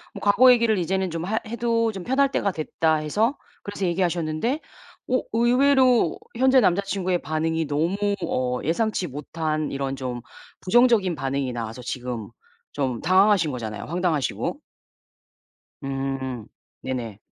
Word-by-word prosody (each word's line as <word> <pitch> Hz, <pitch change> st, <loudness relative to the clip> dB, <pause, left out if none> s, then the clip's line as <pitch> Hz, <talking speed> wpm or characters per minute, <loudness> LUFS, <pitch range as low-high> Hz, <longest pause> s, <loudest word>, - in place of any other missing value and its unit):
뭐 -, -, -7 dB
'과거 250 Hz, +5 st, +6 dB
얘기를 230 Hz, -3 st, +2 dB
이제는 185 Hz, +1 st, -1 dB
좀 165 Hz, +1 st, -4 dB
하 220 Hz, +3 st, 0 dB
해도 230 Hz, 0 st, 0 dB
좀 190 Hz, -3 st, -7 dB
편할 270 Hz, +2 st, +2 dB
때가 200 Hz, -6 st, 0 dB
됐다.' 160 Hz, 0 st, 0 dB
해서 210 Hz, -, 0 dB, 0.3 s
그래서 200 Hz, -1 st, -4 dB
얘기하셨는데 175 Hz, -, -1 dB, 0.5 s
어 255 Hz, -, +3 dB
의외로 250 Hz, -, +4 dB, 0.2 s
현재 260 Hz, +1 st, +5 dB
남자친구의 185 Hz, -1 st, +1 dB
반응이 160 Hz, +1 st, -1 dB
너무 160 Hz, +6 st, 0 dB, 0.3 s
어 125 Hz, 0 st, -1 dB
예상치 185 Hz, +3 st, 0 dB
못한 155 Hz, +2 st, -3 dB
이런 135 Hz, 0 st, -2 dB
좀 125 Hz, -2 st, -4 dB, 0.4 s
부정적인 225 Hz, -4 st, +3 dB
반응이 135 Hz, -1 st, -2 dB
나와서 115 Hz, +1 st, -5 dB
지금 125 Hz, -2 st, -5 dB, 0.4 s
좀 130 Hz, -5 st, -2 dB
당황하신 185 Hz, -1 st, +4 dB
거잖아요 110 Hz, -5 st, -5 dB
황당하시고. 170 Hz, -, -1 dB, 1.3 s
음 135 Hz, -3 st, -3 dB, 0.4 s
네네. 120 Hz, -6 st, -5 dB
170 Hz, 295 characters per minute, -24 LUFS, 135-220 Hz, 1.3 s, 과거